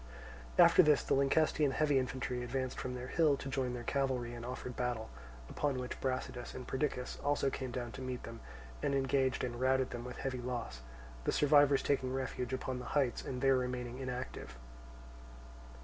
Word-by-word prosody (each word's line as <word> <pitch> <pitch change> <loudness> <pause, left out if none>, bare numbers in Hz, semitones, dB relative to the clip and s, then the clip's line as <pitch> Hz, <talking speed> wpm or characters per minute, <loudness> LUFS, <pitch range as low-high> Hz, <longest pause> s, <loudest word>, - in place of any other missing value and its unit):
After - - +8
this 150 -2 +4
the - - 0
Lyncestian 145 +2 +3
heavy 145 -2 +3
infantry 125 -1 -2
advanced 130 +1 -2
from 125 0 -3
their 125 0 -5
hill 155 -4 +3
to - - -7
join 130 -2 -1
their 120 - -5
cavalry 130 -3 -1
and 120 -1 -7
offered 125 0 -5
battle; 120 - -2 0.4
upon 140 - -1
which 125 0 -5
Brasidas 130 -2 -3
and 125 - -7
Perdiccas 130 -2 -2
also 145 -1 +2
came 130 -1 -4
down 120 -1 -4
to 130 - -8
meet 130 -1 -4
them, 115 0 -8 0.4
and 140 - +1
engaged 135 -1 +1
and 120 -1 -3
routed 130 0 +2
them 120 0 -5
with 125 0 -7
heavy 130 -2 -3
loss; 120 - -4 0.4
the - - +2
survivors 145 -1 +5
taking 130 -2 0
refuge 130 -2 -3
upon 130 0 -2
the 125 - -7
heights 130 -5 +1
and 125 0 -4
there 135 -1 +5
remaining 125 0 -3
inactive. 125 - -5
130 Hz, 180 wpm, -34 LUFS, 125-135 Hz, 0.4 s, After